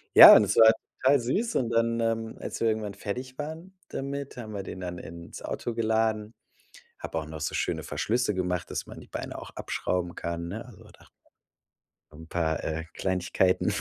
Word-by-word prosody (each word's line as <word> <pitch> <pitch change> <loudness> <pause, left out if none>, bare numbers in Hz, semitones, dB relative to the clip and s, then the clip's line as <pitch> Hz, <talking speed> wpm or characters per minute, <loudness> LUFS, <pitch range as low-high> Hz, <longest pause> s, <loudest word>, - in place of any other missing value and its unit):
Ja, - - +13
und 110 - +7
es 100 0 -1
war 110 -1 +9 0.3
total 135 +1 +5
süß 210 - -1
und 120 -3 +1
dann, 115 0 +1
ähm, 115 -1 -1
als - - -5
wir 115 - +2
irgendwann 110 -2 -1
fertig 125 +6 -5
waren 160 +6 -7
damit, 140 0 -5
haben 110 -3 -7
wir 100 -1 -4
den 95 - -7
dann 90 -1 -5
ins 85 +2 -9
Auto 120 - -4
geladen. 110 -1 0 0.7
Hab - - -8
auch 80 -2 -2
noch 80 0 -8
so 80 - -2
schöne - - -1
Verschlüsse 120 -2 0
gemacht, 90 -2 -2
dass - - -3
man - - -10
die - - -14
Beine - - -6
auch - - -9
abschrauben 90 -1 -2
kann, 85 0 -4
ne? 110 +5 -5
Also 120 -5 -15
da - - -18 1.1
'n 80 +1 -12
paar, 80 -2 -1
äh, 80 +1 -3
Kleinigkeiten 90 0 +1
110 Hz, 185 wpm, -28 LUFS, 90-120 Hz, 1.1 s, Ja